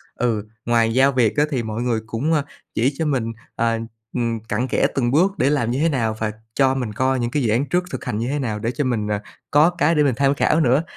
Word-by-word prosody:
ừ, 115 -4 -1 0.2
ngoài 115 -1 +2
giao 135 +2 +4
việc 125 -1 +1
á 150 - +5
thì 130 -6 -1
mọi 110 +1 -4
người 120 -2 0
cũng, 125 +9 -1
ờ, 150 -3 +2 0.3
chỉ 130 +5 +2
cho 160 - -1
mình, 125 -6 0 0.2
à, 115 0 +1 0.4
ừm, 115 -2 -1
cặn 110 +3 -2
kẽ - - +2
từng 120 -3 +1
bước 185 +7 +2
để 135 - +2
làm 130 -6 +1
như 130 - -1
thế 165 +2 +3
nào, 115 -7 0
và 110 -1 -1 0.2
cho 135 -1 +3
mình 120 -5 -3
coi 130 +3 +1
những 120 0 -1
cái 145 -3 0
dự 115 - +1
án 125 +6 +2
trước 180 +1 +1
thực - - -5
hành 105 - -2
như 115 +2 -2
thế 145 +1 -1
nào 110 -6 -2
để 115 +3 -1
cho 145 - -2
mình, 115 -5 -1
à, 105 0 -1 0.3
có 150 +3 +6
cái 170 -1 +1
để 150 - +4
mình 130 -5 +2
tham 140 +1 +3
khảo 155 +2 +2
nữa. 135 +1 +3
125 Hz, 270 wpm, -21 LUFS, 115-145 Hz, 0.4 s, có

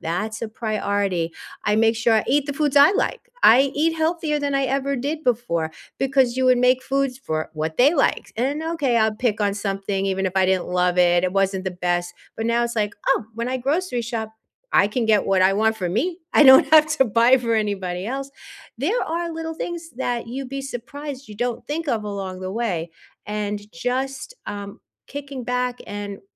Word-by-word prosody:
that's 210 +7 -3
a 225 - -2
priority. 200 -6 -1 0.3
I 210 - +2
make 225 0 +3
sure 225 0 +3
I 220 - +2
eat 285 +2 +2
the 285 - -2
foods 290 -1 -1
I 285 +7 +8
like. 475 - -1 0.2
I 265 +4 +6
eat 325 +2 +1
healthier 320 -1 0
than 285 -1 -2
I 275 0 +2
ever 275 +1 -1
did 295 +4 -3
before, 190 -10 0 0.3
because 265 -2 +2
you 260 - +1
would 255 -1 +5
make 250 +1 +3
foods 270 -1 -1
for 155 -11 -3
what 155 +1 -3
they 280 +6 +5
liked, 275 - 0
and, 275 +6 -1
okay, 315 -7 0
I'll 220 -1 +2
pick 220 -2 0
on 200 -1 +1
something 195 -1 -2
even 190 0 0
if 185 - -2
I 190 -1 +4
didn't 185 -1 +1
love 180 0 +1
it, 175 0 +4
it 180 - 0
wasn't 195 -1 0
the 190 - -1
best, 175 0 -2 0.2
but 225 - -2
now 235 +1 +2
it's 235 -1 -3
like, 210 -1 0
"Oh, 270 -4 +2
when 235 +2 -3
I 260 - -1
grocery 275 0 -1
shop, 225 -2 -4 0.4
I 200 - +5
can 225 +1 -1
get 210 -2 +3
what 195 -1 +2
I 190 +1 +4
want 220 +2 +2
for 185 -5 -3
me. 310 - -1 0.2
I - - +7
don't 265 -1 +8
have 310 -1 +7
to 265 - +6
buy 235 +3 +4
for 230 -2 -1
anybody 190 -4 -2
else." 275 +2 -4 0.5
There 340 - 0
are 335 +1 -3
little 325 0 -5
things 340 0 -6
that 245 -1 -3
you'd 260 +2 -6
be 275 0 -4
surprised 275 +2 -7
you 210 - -9
don't 240 +1 -3
think 310 +1 -3
of 220 -4 0
along 195 -3 -5
the 185 0 -5
way, 185 -8 -2 0.4
and 210 0 -4
just, 265 - -3
um, 200 -1 -7 0.3
kicking 280 -3 -7
back 250 0 -1
and 205 -1 -6
235 Hz, 205 wpm, -22 LUFS, 200-275 Hz, 0.5 s, I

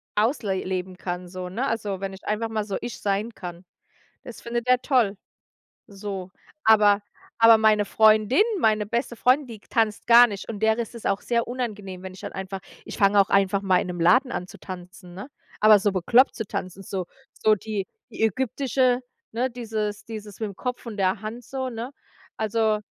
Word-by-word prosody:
ausle 215 -2 +1
leben 185 0 -4
kann 180 -1 -5
so, 180 0 -6
ne, 240 +9 -2
also 205 -4 -2
wenn 195 0 -4
ich 190 - -12
einfach 225 +2 -1
mal 220 -1 -1
so 200 - -3
ich 240 - -6
sein 205 +3 -1
kann. 175 -1 -8 0.6
Das 245 - -10
findet 235 0 -3
er 255 0 +5
toll, 235 -8 +2 0.7
so. 195 -2 -6 0.3
Aber 210 -2 +5 0.4
aber 230 0 +8
meine 215 -1 +4
Freundin, 215 - +4 0.2
meine 215 -5 +2
beste 235 +2 -2
Freundin, 260 +5 +3
die 225 -3 -9
tanzt 220 0 -1
gar 240 +1 +9
nicht 205 -1 -7
und 210 -2 -6
der 220 0 +3
ist 235 0 -4
es 230 - -10
auch 200 +1 0
sehr 235 +1 0
unangenehm, 205 -7 -5
wenn 190 -1 -7
ich 185 - -12
dann - - -6
einfach 190 0 -6 0.2
ich - - -8
fange 200 0 +4
auch 195 - -1
einfach 195 0 +2
mal 185 -2 +3
in - - -5
'nem 175 -1 -5
Laden 250 +9 +4
an 180 - -4
zu - - -13
tanzen, 180 0 -10
ne? 200 - -7 0.3
Aber 215 -1 +7
so 205 +1 +1
bekloppt 230 +8 +4
zu 220 - -4
tanzen, 185 +1 -5
so 185 -1 -4 0.4
so 215 - +6
die 210 -1 -4 0.3
die - - -3
ägyptische 255 +2 +1 0.3
ne, 245 +3 -1
dieses 220 -3 -4
dieses 215 -3 -9
mit'm 205 -3 -3
Kopf 250 +4 -5
und 215 -3 -6
der 190 +1 +1
Hand 225 +3 -6
so, 260 0 -4
ne? 235 +2 -6 0.5
Also 220 0 +1
215 Hz, 195 wpm, -25 LUFS, 195-235 Hz, 0.7 s, gar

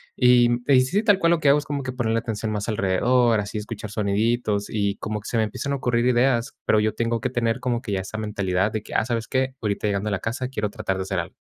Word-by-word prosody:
y, 125 -1 +5
mm, 120 0 -1 0.2
sí, 195 +12 0
tal 205 -3 +4
cual 170 -2 +3
lo 170 - +3
que 150 - +3
hago 145 +2 +5
es 145 - -8
como 140 -1 -3
ponerle 120 -3 -1
atención 110 -1 -4
más 105 -1 -3
alrededor, 115 +3 +2
así 105 +1 -4
escuchar 105 -1 -7
soniditos 105 0 0
y 100 -2 0
como 105 0 -4
que - - -10
se 115 - -1
me 110 - +3
empiezan 110 +6 -4
a - - +1
ocurrir 120 -3 0
ideas, 120 -1 +2
pero 110 - +3
yo 110 0 0
tengo 115 -1 -1
que - - -1
tener 115 -2 0
como 120 -2 -1
que 105 - -5
ya 95 - 0
esa 95 +3 -6
mentalidad 100 -2 -1
de 110 -1 -3
que: - - -9
"Ah, - - +2
¿sabes 115 -2 -2
qué?, 130 0 -1
ahorita 105 -2 -2
llegando 100 +1 -1
a - - -3
la 100 - 0
casa 125 +3 -3
quiero 105 -5 -3
tratar 95 -1 -3
de 95 - -2
hacer 95 -1 -2
algo". 85 - -6
115 Hz, 265 wpm, -23 LUFS, 105-125 Hz, 0.2 s, y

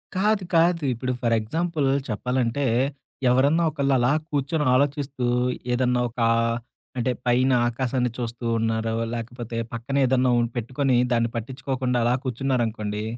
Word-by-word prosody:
కాదు. 205 +1 +2
కాదు. 165 0 +3
ఇప్పుడు 125 +2 -3
ఫర్ 115 -1 +2
ఎగ్జాంపుల్ 160 +5 -1 0.2
చెప్పాలంటే 125 +4 -1 0.7
ఎవరన్నా 140 +7 +3
ఒకళ్ళు 140 -2 0
అలా 125 +1 +2 0.2
కూర్చొని 150 +1 -1
ఆలోచిస్తూ 140 -1 0 0.5
ఏదన్నా 125 0 +1
ఒకా 115 -1 0 0.7
అంటే 125 +1 +1
పైన 125 +2 +3 0.2
ఆకాశాన్ని 125 0 -1
చూస్తూ 120 0 -5
ఉన్నారో 115 0 -1 0.2
లేకపోతే 120 0 -5 0.2
పక్కన 120 +4 -4
ఏదన్నా 130 0 +2
ఉంటె 120 - +1
హ్మ్. 115 - -17
పెట్టుకొని 130 +3 0 0.2
దాన్ని 115 -1 +1
పట్టించుకోకుండా 130 +1 -2
అలా 120 +1 +3
కూర్చున్నారనుకోండి 115 -5 -1
125 Hz, 130 wpm, -24 LUFS, 120-140 Hz, 0.7 s, కాదు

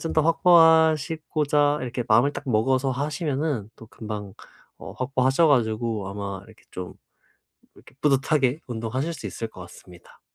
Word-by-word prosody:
좀 165 - -4
더 155 - +4
확보하시고자 160 -3 +3
이렇게 125 -1 -4
마음을 120 +6 +4
딱 - - -7
먹어서 130 +4 +1
하시면은 140 - -2
또 115 - -13
금방 105 -3 -8 0.4
어 - - -9
확보하셔 130 +4 +1
가지고 110 -5 0
아마 100 -1 -6
이렇게 110 0 -19
좀 90 -1 -7 0.8
이렇게 - - -19
뿌듯하게 140 0 +2
운동하실 120 +7 -3
수 - - -8
있을 115 - -6
것 100 - -14
같습니다. 85 0 -16
130 Hz, 335 characters per minute, -24 LUFS, 110-150 Hz, 0.8 s, 더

